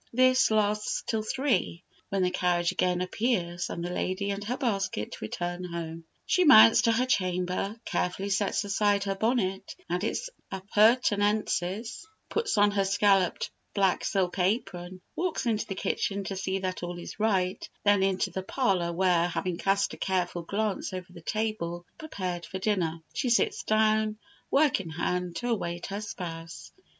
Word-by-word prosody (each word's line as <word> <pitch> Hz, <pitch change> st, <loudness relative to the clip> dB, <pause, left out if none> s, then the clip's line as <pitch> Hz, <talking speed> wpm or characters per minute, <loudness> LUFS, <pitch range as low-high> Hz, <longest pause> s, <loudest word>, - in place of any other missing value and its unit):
This 255 Hz, +1 st, +4 dB
lasts 210 Hz, -1 st, +1 dB
till 220 Hz, -2 st, -1 dB
three, 215 Hz, -, -1 dB, 0.3 s
when 195 Hz, -1 st, 0 dB
the 180 Hz, -, +1 dB
carriage 175 Hz, -1 st, +1 dB
again 180 Hz, 0 st, +1 dB
appears, 180 Hz, -4 st, -1 dB
and 170 Hz, -, -4 dB
the 175 Hz, -, -3 dB
lady 185 Hz, +3 st, -1 dB
and 200 Hz, +1 st, -4 dB
her 245 Hz, +4 st, -2 dB
basket 195 Hz, -, -2 dB
return 175 Hz, +10 st, -4 dB
home; 165 Hz, -2 st, -6 dB, 0.2 s
she 365 Hz, -, +3 dB
mounts 225 Hz, -7 st, +8 dB
to 230 Hz, -, +3 dB
her 240 Hz, +3 st, +2 dB
chamber, 185 Hz, -1 st, -1 dB
carefully 190 Hz, +3 st, -1 dB
sets 195 Hz, +1 st, +1 dB
aside 205 Hz, 0 st, +1 dB
her 195 Hz, -1 st, -1 dB
bonnet 195 Hz, -2 st, -1 dB
and 180 Hz, +2 st, -1 dB
its -, -, -2 dB, 0.2 s
appurtenances, 210 Hz, -, +1 dB, 0.2 s
puts 450 Hz, -, -1 dB
on 205 Hz, 0 st, +5 dB
her 200 Hz, -1 st, +1 dB
scalloped 195 Hz, -2 st, +2 dB, 0.2 s
black 195 Hz, -2 st, +2 dB
silk 190 Hz, -1 st, 0 dB
apron, 185 Hz, -2 st, -1 dB
walks 350 Hz, -6 st, -1 dB
into 220 Hz, -3 st, 0 dB
the 195 Hz, -, -4 dB
kitchen 200 Hz, +1 st, -1 dB
to 195 Hz, -, -4 dB
see 190 Hz, 0 st, -2 dB
that 185 Hz, -1 st, -3 dB
all 175 Hz, 0 st, -5 dB
is 175 Hz, -, -9 dB
right, 190 Hz, -4 st, 0 dB
then 205 Hz, -1 st, +4 dB
into 190 Hz, -1 st, +1 dB
the 190 Hz, -, -3 dB
parlour, 185 Hz, -5 st, 0 dB
where, 175 Hz, -1 st, +2 dB
having 175 Hz, 0 st, -3 dB
cast 195 Hz, 0 st, +1 dB
a -, -, -8 dB
careful 180 Hz, -2 st, -1 dB
glance 200 Hz, +3 st, -2 dB
over 180 Hz, -1 st, -7 dB
the 170 Hz, -, -11 dB
table 175 Hz, -4 st, -3 dB
prepared 185 Hz, -, -4 dB
for 190 Hz, -, -5 dB
dinner, 185 Hz, -5 st, 0 dB, 0.2 s
she 255 Hz, -, -1 dB
sits 235 Hz, -, +2 dB
down, 215 Hz, 0 st, +2 dB, 0.3 s
work 285 Hz, -3 st, +3 dB
in 170 Hz, -, -8 dB
hand, 180 Hz, +2 st, -2 dB
to 245 Hz, -, -3 dB
await 175 Hz, -6 st, -2 dB
her 200 Hz, +1 st, -4 dB
spouse. 165 Hz, -5 st, -7 dB
195 Hz, 160 wpm, -28 LUFS, 180-215 Hz, 0.3 s, mounts